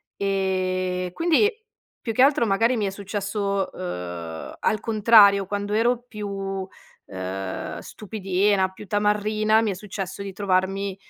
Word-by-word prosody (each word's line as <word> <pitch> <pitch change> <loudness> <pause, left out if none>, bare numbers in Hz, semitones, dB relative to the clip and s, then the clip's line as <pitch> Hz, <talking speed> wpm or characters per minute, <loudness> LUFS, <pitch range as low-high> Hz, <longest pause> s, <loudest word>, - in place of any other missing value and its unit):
E 185 -2 -1
quindi, 345 +6 +3 0.5
più 230 - -4
che 250 - +2
altro, 275 -3 +5
magari 225 +4 +2
mi 210 - 0
è 195 - -1
successo, 200 0 -2
uhm, 90 -2 -6
al 215 - +1
contrario. 210 -3 +5
Quando 205 +1 -3
ero 235 +3 +3
più, 195 -3 -4 0.4
ehm, 95 0 -5
stupidina, 195 -2 0
più 190 +2 -12
tamarrina, 210 +2 +2
mi 215 - 0
è - - -2
successo 190 0 -6
di 200 -1 -5
trovarmi, 195 0 0
200 Hz, 130 wpm, -24 LUFS, 185-215 Hz, 0.5 s, altro